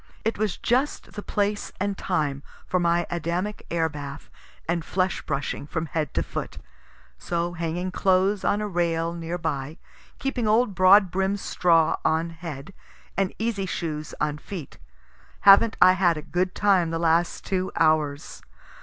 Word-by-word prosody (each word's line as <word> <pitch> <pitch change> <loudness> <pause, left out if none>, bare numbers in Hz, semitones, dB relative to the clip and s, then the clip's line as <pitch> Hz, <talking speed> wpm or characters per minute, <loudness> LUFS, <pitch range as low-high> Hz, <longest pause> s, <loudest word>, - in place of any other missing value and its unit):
It 225 -2 -1
was 215 -4 0
just 260 +5 0
the 205 - -6
place 205 0 -1
and 200 +1 -1
time 150 -8 -1 0.2
for 185 - 0
my 170 0 +2
Adamic 175 +5 -3
air 165 -1 +1
bath 145 -2 -8 0.4
and 170 0 0
flesh 185 +2 -1
brushing 140 +1 -3
from 160 +1 -3
head 155 -3 -2
to - - +1
foot. - - -6 0.6
So 175 0 -2
hanging 175 +2 -3
clothes 190 +1 +2
on 205 - +1
a 210 - -2
rail 170 -3 0
near 170 0 -4
by, 155 -2 -3 0.4
keeping 260 -4 -2
old 220 0 +3
broadbrim 190 +1 +4
straw 170 -4 +2
on 165 +1 +1
head 165 -1 -8 0.4
and 195 -1 0
easy 215 -4 -2
shoes 155 -4 -4
on 150 0 -1
feet, 170 -4 -8 0.7
havn't 200 +3 +7
I 185 - +8
had 180 -3 +2
a 150 - -6
good 180 +3 -1
time 190 -5 +3
the 165 - -2
last 165 +1 +1
two 185 -1 -1
hours! 155 -3 +1
175 Hz, 155 wpm, -25 LUFS, 160-195 Hz, 0.7 s, I